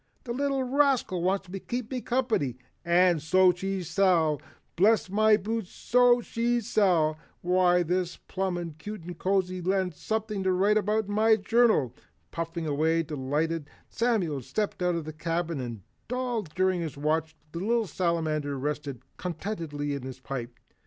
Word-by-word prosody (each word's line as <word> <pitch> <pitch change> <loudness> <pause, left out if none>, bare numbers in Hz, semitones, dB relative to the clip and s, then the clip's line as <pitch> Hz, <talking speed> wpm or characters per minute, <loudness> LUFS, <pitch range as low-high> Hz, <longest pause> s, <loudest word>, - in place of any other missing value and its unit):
"The 240 - -4
little 275 0 0
rascal 260 -8 +2
wants 190 +2 0
to 195 +2 -6
keep 245 +3 -4
me 255 -1 -2
company, 230 - 0 0.3
and 175 -1 +4
so 185 +4 +5
she 190 +1 -3
shall, 165 -4 +2 0.3
bless 200 +1 +3
my 215 +1 +5
boots, 215 -1 -3
so 245 0 +3
she 235 +1 0
shall! 175 -8 +2 0.2
Why 180 0 +3
this 180 +1 -1
is - - -14
plumb 175 -4 -2
cute 210 +1 -7
and 175 +1 -7
cozy 185 +1 0
and 185 0 0
something 215 +3 -3
to 190 0 +1
write 200 +4 +3
in 215 +1 0
my 220 +1 +5
journal." 215 - +3 0.4
Puffing 165 0 -4
away 160 +3 +1
delightedly 150 +2 -2 0.2
Samuel 200 - 0
stepped 205 - -3
out 180 -1 +2
of 165 -2 -3
the 155 - -6
cabin 165 0 -2
and 115 -6 -6 0.3
all 250 -2 -1
during 185 +1 0
his 160 -4 -5
watch, 160 +2 0 0.2
the 170 - -5
little 225 +4 +1
Salamander 155 -5 -1
rested 145 -2 -4
contentedly 165 -6 -4
in 140 - -4
his 130 0 -8
pipe. 125 -2 -6
180 Hz, 155 wpm, -28 LUFS, 160-215 Hz, 0.4 s, so